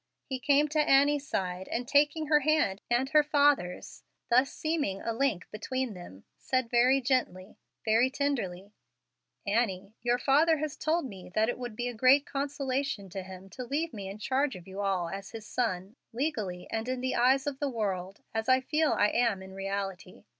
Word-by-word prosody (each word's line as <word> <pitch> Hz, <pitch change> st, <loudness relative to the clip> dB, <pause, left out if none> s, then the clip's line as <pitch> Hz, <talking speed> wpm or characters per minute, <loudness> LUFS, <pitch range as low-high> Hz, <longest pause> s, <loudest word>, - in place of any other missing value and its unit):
He 265 Hz, -2 st, -4 dB
came 285 Hz, +3 st, +3 dB
to 305 Hz, +1 st, 0 dB
Annie's 285 Hz, 0 st, +4 dB
side, 185 Hz, 0 st, -3 dB
and 245 Hz, +1 st, -3 dB
taking 295 Hz, +3 st, +3 dB
her 300 Hz, 0 st, +4 dB
hand 295 Hz, -10 st, +1 dB
and 240 Hz, +2 st, +2 dB
her 300 Hz, +1 st, +6 dB
father's, 290 Hz, -, +1 dB, 0.3 s
thus 255 Hz, +3 st, +4 dB
seeming 305 Hz, -12 st, -2 dB
a 230 Hz, -, -3 dB
link 225 Hz, -7 st, 0 dB
between 255 Hz, +3 st, -3 dB
them, 175 Hz, -, -11 dB, 0.2 s
said 255 Hz, -3 st, -1 dB
very 250 Hz, +3 st, +4 dB
gently, 235 Hz, -7 st, -1 dB, 0.3 s
very 225 Hz, +3 st, +4 dB
tenderly, 220 Hz, -9 st, -2 dB, 0.7 s
"Annie, 200 Hz, -2 st, 0 dB
your 240 Hz, +1 st, +2 dB
father 305 Hz, +6 st, +3 dB
has 300 Hz, -1 st, -3 dB
told 320 Hz, 0 st, 0 dB
me 195 Hz, -8 st, -9 dB
that 220 Hz, +1 st, +3 dB
it 245 Hz, -, -3 dB
would 240 Hz, -3 st, -6 dB
be 240 Hz, +2 st, -2 dB
a 245 Hz, -, -3 dB
great 260 Hz, +5 st, +5 dB
consolation 275 Hz, -6 st, -2 dB
to 190 Hz, +2 st, -5 dB
him 185 Hz, 0 st, -10 dB
to 255 Hz, -, -6 dB
leave 300 Hz, +6 st, -2 dB
me 195 Hz, -3 st, -6 dB
in 195 Hz, -, -7 dB
charge 265 Hz, +5 st, 0 dB
of 180 Hz, -1 st, -11 dB
you 190 Hz, +1 st, -6 dB
all 190 Hz, -3 st, 0 dB
as 195 Hz, +4 st, -7 dB
his 225 Hz, -2 st, -8 dB
son, 210 Hz, -4 st, -2 dB, 0.2 s
legally 220 Hz, -, -3 dB
and 225 Hz, +2 st, -2 dB
in 255 Hz, -1 st, -2 dB
the 260 Hz, 0 st, -1 dB
eyes 265 Hz, +3 st, +3 dB
of 280 Hz, -2 st, -3 dB
the 285 Hz, -, 0 dB
world, 195 Hz, -5 st, -3 dB
as 225 Hz, +2 st, -2 dB
I 260 Hz, 0 st, +6 dB
feel 300 Hz, +3 st, +1 dB
I 205 Hz, -, +3 dB
am 230 Hz, -5 st, +1 dB
in 190 Hz, 0 st, -11 dB
reality. 195 Hz, -1 st, -5 dB
245 Hz, 190 wpm, -29 LUFS, 195-275 Hz, 0.7 s, her